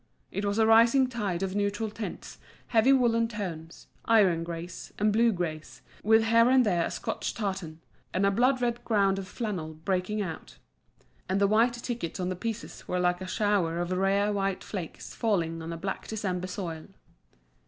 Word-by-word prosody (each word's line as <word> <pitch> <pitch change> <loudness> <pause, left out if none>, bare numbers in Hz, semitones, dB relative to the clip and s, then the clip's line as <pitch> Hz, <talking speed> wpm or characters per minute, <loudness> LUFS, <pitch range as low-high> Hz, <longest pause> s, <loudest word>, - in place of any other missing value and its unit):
It 200 +2 -2
was 200 +1 0
a 220 - +4
rising 230 +4 +6
tide 205 -8 -2
of 190 -1 -2
neutral 205 +1 -1
tints, 215 0 -7 0.3
heavy 235 +3 +4
woollen 235 -3 +3
tones, 175 -7 -6 0.2
iron 195 -7 +4
greys, 170 +1 -7
and 210 0 +2
blue 230 +2 +4
greys, 165 -5 -5 0.2
with 220 +1 +5
here 230 +1 +5
and 260 -1 +5
there 175 -5 +1
a - - -5
Scotch - - -4
tartan, 190 -7 -4 0.3
and 190 +2 +1
a 200 - +4
blood 250 +4 +2
red 240 0 -1
ground 195 -3 +2
of 190 - -6
flannel 185 -7 -4
breaking 190 +3 0
out. 175 -6 -6 0.7
And 190 +1 +1
the 200 - +4
white 225 +4 +3
tickets 235 -7 -4
on 180 0 -1
the 185 - -2
pieces 225 +4 -6
were 180 - -1
like 180 0 +1
a 185 - -5
shower 195 -5 +1
of 175 +1 -2
rare 195 +2 +2
white 195 -1 -1
flakes 180 -6 -7
falling 170 -7 0
on 165 +1 -6
a 165 - -4
black 190 +3 -4
December 185 -4 -3
soil. 170 -4 -5
200 Hz, 180 wpm, -28 LUFS, 180-225 Hz, 0.7 s, rising